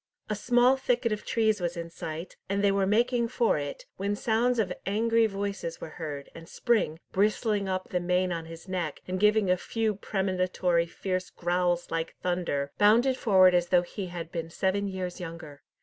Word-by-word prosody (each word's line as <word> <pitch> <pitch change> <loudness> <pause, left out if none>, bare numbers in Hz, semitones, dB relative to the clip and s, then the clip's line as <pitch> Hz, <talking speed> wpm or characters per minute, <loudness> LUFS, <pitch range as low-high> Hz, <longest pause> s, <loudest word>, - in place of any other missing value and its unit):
A - - +1
small 245 +4 +4
thicket 245 -3 0
of 210 0 -2
trees 220 -3 +1
was 175 0 -2
in 170 0 -5
sight, 165 +1 -6
and 200 +1 0
they 200 - +5
were 195 -1 +1
making 235 +3 +2
for 230 -8 +1
it, 145 -1 -6
when 200 +2 -1
sounds 235 +4 +1
of 195 -5 0
angry 225 +2 +3
voices 195 -4 -4
were 155 - -7
heard, 145 -3 -5
and 165 0 -11
Spring, 225 -10 +1
bristling 210 0 +1
up 185 0 -2
the 180 - 0
mane 180 +1 +1
on 165 -1 -3
his 165 +2 -11
neck, 175 -5 -3
and 185 0 -2
giving 210 -2 +4
a 180 - +3
few 220 +3 -1
premonitory 185 -3 0
fierce 185 +1 -3
growls 175 0 0
like 165 0 -2
thunder, 170 -6 -1
bounded 235 +6 +5
forward 190 -7 +5
as 175 -1 +2
though 175 0 +4
he 190 +2 -6
had 170 -2 -7
been 165 -1 -4
seven 190 +4 0
years 185 -2 -4
younger. 165 -4 -8
185 Hz, 185 wpm, -28 LUFS, 175-215 Hz, -, they